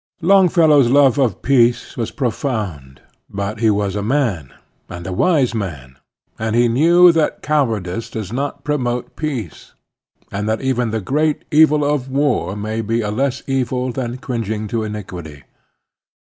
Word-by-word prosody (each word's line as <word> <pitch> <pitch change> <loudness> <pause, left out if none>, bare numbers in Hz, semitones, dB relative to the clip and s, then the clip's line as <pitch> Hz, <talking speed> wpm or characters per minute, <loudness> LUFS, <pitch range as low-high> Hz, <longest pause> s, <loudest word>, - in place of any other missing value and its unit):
Longfellow's 165 -8 +5
love 140 0 +4
of 120 -9 0
peace 120 -3 +2
was 115 -2 -3
profound; 105 - -4 0.3
but 100 +2 -4
he 110 -1 +3
was 100 -2 0
a 105 - -2
man, 105 - -1 0.4
and 85 0 -8
a 95 - -4
wise 140 - +2
man, 70 - -6 0.4
and 110 0 -1
he 120 0 +4
knew 170 +9 +5
that 165 -2 -1
cowardice 115 -9 -1
does 110 -1 -6
not 140 +2 -3
promote 125 -5 -2
peace, 130 - -5 0.6
and 105 +2 -3
that 110 - 0
even 125 -3 0
the 110 0 -2
great 150 +9 0
evil 150 -1 +4
of 145 -3 -1
war 135 -7 0
may 110 +2 -3
be 115 +2 -1
a 105 -1 -3
less 135 +4 -1
evil 130 -1 -1
than 120 -1 -4
cringing 110 -4 -4
to 115 +1 -1
iniquity. 90 -9 -7
120 Hz, 150 wpm, -18 LUFS, 105-140 Hz, 0.6 s, Longfellow's